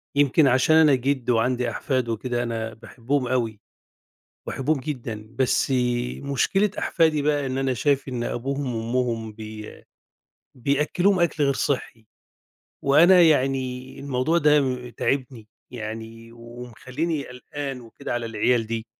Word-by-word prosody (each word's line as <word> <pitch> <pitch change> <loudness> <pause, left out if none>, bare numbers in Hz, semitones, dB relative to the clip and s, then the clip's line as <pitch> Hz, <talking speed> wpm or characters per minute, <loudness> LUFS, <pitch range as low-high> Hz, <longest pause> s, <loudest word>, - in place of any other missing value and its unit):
يمكن 145 +1 +4
عشان 130 +5 +4
أنا 155 -4 +6
جِد 130 -1 -1
وعندي 125 +1 +1
أحفاد 130 -4 -1
وكده 120 +2 -2
أنا 115 -1 -3
باحبهم 125 +4 -3
أوي، 115 -4 -1 0.9
باحبهم 145 +2 -1
جدًا، 120 -6 -6
بس 130 +1 +2 0.5
مشكلة 185 +9 +1
أحفادي 160 -4 +2
بَقى 145 -1 +1
إن 130 0 -2
أنا 135 -1 0
شايف 140 +2 0
إن 125 -2 -3
أبوهم 140 +4 -3
وأمهم 115 -1 -2
بي 110 -1 -9 0.7
بيأكلوهم 150 +9 +1
أكل 165 -3 +1
غير 140 -1 +3
صحّي. 125 -5 -2 0.8
وأنا 170 +7 +6
يعني 130 -4 +1
الموضوع 140 +4 0
ده 135 -5 +2
تاعبني 125 -3 -2 0.2
يعني 115 0 -7
ومخليني 125 +6 -5
قلقان 135 +1 -6
وكده 115 -2 -7
على 120 -1 -2
العيال 115 +1 +1
دي. 115 0 -4
130 Hz, 125 wpm, -24 LUFS, 115-140 Hz, 0.9 s, أنا